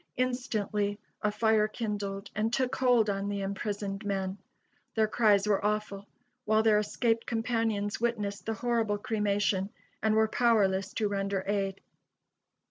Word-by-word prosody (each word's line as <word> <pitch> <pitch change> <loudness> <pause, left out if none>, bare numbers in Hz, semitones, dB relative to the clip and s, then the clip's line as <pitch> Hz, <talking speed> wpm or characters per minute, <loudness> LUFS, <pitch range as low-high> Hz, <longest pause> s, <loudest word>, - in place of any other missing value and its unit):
Instantly 215 -5 -1 0.2
a 210 - +1
fire 215 0 +3
kindled 205 -3 -4
and 215 +2 0
took 255 0 0
hold 245 -4 +4
on 200 0 -1
the 200 -1 -2
imprisoned 200 +1 -3
men. 195 -1 -2 0.6
Their 220 -1 +3
cries 210 -3 +3
were 205 -2 +1
awful, 210 -1 -2 0.4
while 220 -1 +3
their 215 -2 +5
escaped 230 +2 0
companions 225 -3 -1
witnesssed 210 -5 -2
the 225 - -2
horrible 225 -2 0
cremation 205 -2 0 0.3
and 215 0 +2
were 220 0 +4
powerless 200 -5 +2
to 215 - +1
render 195 -1 -1
aid. 195 -1 -1
210 Hz, 135 wpm, -30 LUFS, 200-225 Hz, 0.6 s, their